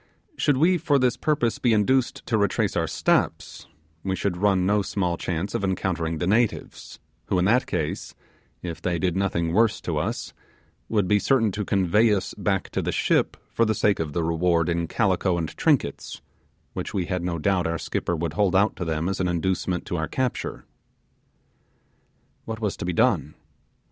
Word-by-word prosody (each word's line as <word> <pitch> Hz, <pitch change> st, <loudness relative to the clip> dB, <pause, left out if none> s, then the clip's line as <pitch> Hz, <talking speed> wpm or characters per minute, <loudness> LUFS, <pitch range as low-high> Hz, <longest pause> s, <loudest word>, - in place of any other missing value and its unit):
Should 145 Hz, -, +2 dB
we 175 Hz, +5 st, +3 dB
for 155 Hz, -4 st, +2 dB
this 125 Hz, -2 st, +2 dB
purpose 145 Hz, -7 st, 0 dB
be 120 Hz, -3 st, +3 dB
induced 120 Hz, +5 st, +1 dB
to 115 Hz, -, 0 dB
retrace 100 Hz, -3 st, +1 dB
our -, -, +1 dB
steps, -, -, 0 dB, 0.4 s
we 95 Hz, -1 st, -1 dB
should 95 Hz, -1 st, -1 dB
run 95 Hz, 0 st, +2 dB
no 105 Hz, +2 st, +3 dB
small 90 Hz, -3 st, -1 dB
chance 90 Hz, +2 st, -3 dB
of 115 Hz, -3 st, -2 dB
encountering 85 Hz, -4 st, -1 dB
the 80 Hz, -, -2 dB
natives, 110 Hz, +4 st, -1 dB, 0.3 s
who 95 Hz, -, +1 dB
in 90 Hz, -, +2 dB
that 120 Hz, +6 st, +3 dB
case, -, -, -3 dB, 0.5 s
if 85 Hz, -2 st, -5 dB
they 90 Hz, -1 st, 0 dB
did 90 Hz, +1 st, 0 dB
nothing 85 Hz, -4 st, 0 dB
worse 110 Hz, +2 st, +3 dB
to -, -, -2 dB
us, -, -, -3 dB, 0.6 s
would 105 Hz, -4 st, +1 dB
be 105 Hz, +1 st, +3 dB
certain 115 Hz, -3 st, +2 dB
to 105 Hz, +2 st, -3 dB
convey 100 Hz, +3 st, +3 dB
us 95 Hz, -, -3 dB
back 95 Hz, -2 st, -1 dB
to -, -, -1 dB
the -, -, -2 dB
ship -, -, +1 dB
for 115 Hz, -, +2 dB
the 110 Hz, -1 st, +1 dB
sake 105 Hz, -2 st, +2 dB
of 80 Hz, -3 st, -3 dB
the 85 Hz, -, 0 dB
reward 85 Hz, 0 st, +1 dB
in 85 Hz, -1 st, 0 dB
calico 95 Hz, -3 st, +1 dB
and 80 Hz, -2 st, -4 dB
trinkets, -, -, 0 dB, 0.5 s
which -, -, -5 dB
we 95 Hz, -3 st, 0 dB
had 90 Hz, 0 st, -2 dB
no 85 Hz, -1 st, -2 dB
doubt 90 Hz, +1 st, +1 dB
our 85 Hz, 0 st, -1 dB
skipper 85 Hz, -, -2 dB
would 80 Hz, -1 st, -3 dB
hold 100 Hz, -3 st, +1 dB
out 100 Hz, +3 st, +3 dB
to -, -, -3 dB
them 80 Hz, +1 st, -1 dB
as 95 Hz, -, -2 dB
an 90 Hz, -, +1 dB
inducement 90 Hz, +1 st, -1 dB
to 90 Hz, -, -3 dB
our 80 Hz, 0 st, -1 dB
capture. 130 Hz, -2 st, -3 dB, 1.8 s
What 110 Hz, -1 st, -5 dB
was 105 Hz, -4 st, -1 dB
to -, -, -5 dB
be 90 Hz, -, -1 dB
done? 75 Hz, -2 st, +1 dB
95 Hz, 190 wpm, -25 LUFS, 85-110 Hz, 1.8 s, we